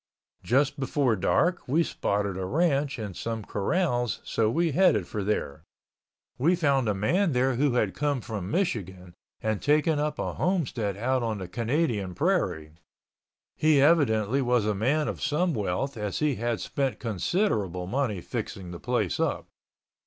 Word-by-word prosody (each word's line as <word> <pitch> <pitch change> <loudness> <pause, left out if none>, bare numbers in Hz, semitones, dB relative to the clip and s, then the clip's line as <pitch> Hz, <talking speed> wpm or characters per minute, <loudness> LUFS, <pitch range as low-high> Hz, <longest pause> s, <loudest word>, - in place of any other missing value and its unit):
Just 140 +4 +1
before 135 -3 +1
dark 175 - +1
we 155 +6 +3
spotted 100 - -1
a 95 - -3
ranch 145 - +1
and 105 -5 -6
some 115 0 -4
corrals 120 - 0
so 110 -1 +1
we 165 +6 +1
headed 140 - +3
for 105 +3 -4
there. 80 -7 -2 0.8
We 165 +8 +4
found 140 -8 +2
a 105 - +1
man 165 - +1
there 130 +1 +2
who 135 +1 +1
had 105 -6 +1
come 145 -1 0
from 105 -6 -5
Michigan 95 - -2 0.3
and 110 -2 -1
taken 150 +1 +2
up 150 +1 -1
a - - -3
homestead 125 - -1
out 130 +4 0
on 115 -2 -2
the 95 -2 -6
Canadian 115 - -1
Prairie. 75 -2 0 0.8
He 155 -2 +4
evidently 135 -5 +3
was 125 -4 +2
a 105 - +1
man 140 +10 +1
of - - -4
some 170 +3 +1
wealth 110 +5 -2
as 105 -3 -3
he 150 -2 +1
had 120 0 -1
spent 135 -3 -2
considerable 105 - -1
money 110 -3 -1
fixing 90 0 -5
the 85 - -7
place - - -1
up. - - -1
120 Hz, 160 wpm, -27 LUFS, 105-150 Hz, 0.8 s, We